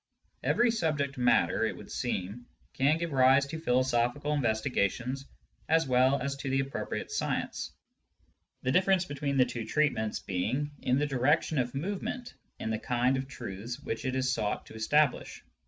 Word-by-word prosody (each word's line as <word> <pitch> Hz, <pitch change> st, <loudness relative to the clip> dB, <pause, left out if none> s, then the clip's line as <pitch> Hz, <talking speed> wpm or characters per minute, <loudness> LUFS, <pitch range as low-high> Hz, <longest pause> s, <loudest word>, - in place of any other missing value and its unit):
Every 240 Hz, -1 st, +3 dB
subject 145 Hz, -, -1 dB
matter, 125 Hz, 0 st, +3 dB
it -, -, -1 dB
would -, -, -11 dB
seem, 100 Hz, +7 st, -3 dB, 0.3 s
can 140 Hz, +4 st, +3 dB
give 170 Hz, 0 st, -3 dB
rise 135 Hz, +1 st, +5 dB
to 160 Hz, +3 st, -6 dB
philosophical 130 Hz, +1 st, +1 dB
investigations 125 Hz, 0 st, 0 dB, 0.4 s
as 160 Hz, +1 st, +4 dB
well 130 Hz, +2 st, +4 dB
as 140 Hz, +2 st, -2 dB
to 140 Hz, -1 st, -4 dB
the 135 Hz, +1 st, +2 dB
appropriate 135 Hz, 0 st, -4 dB
science, -, -, -2 dB, 0.9 s
the 130 Hz, -, +1 dB
diflFerence 185 Hz, +2 st, +3 dB
between 140 Hz, -1 st, -2 dB
the 130 Hz, -, +6 dB
two 120 Hz, -2 st, -4 dB
treatments 110 Hz, -4 st, 0 dB
being 130 Hz, +11 st, -2 dB
in 125 Hz, +1 st, +2 dB
the 145 Hz, -, +2 dB
direction 140 Hz, +2 st, +2 dB
of 125 Hz, +1 st, -1 dB
movement 200 Hz, -, -4 dB, 0.3 s
and -, -, -3 dB
in -, -, 0 dB
the 110 Hz, -, -1 dB
kind 125 Hz, +2 st, +2 dB
of 130 Hz, 0 st, -3 dB
truths 120 Hz, -1 st, -6 dB
which 115 Hz, -6 st, -4 dB
it 130 Hz, -1 st, -1 dB
is 130 Hz, 0 st, +1 dB
sought 105 Hz, -3 st, -2 dB
to -, -, -13 dB
establish. 140 Hz, +5 st, +1 dB
130 Hz, 165 wpm, -30 LUFS, 120-145 Hz, 0.9 s, the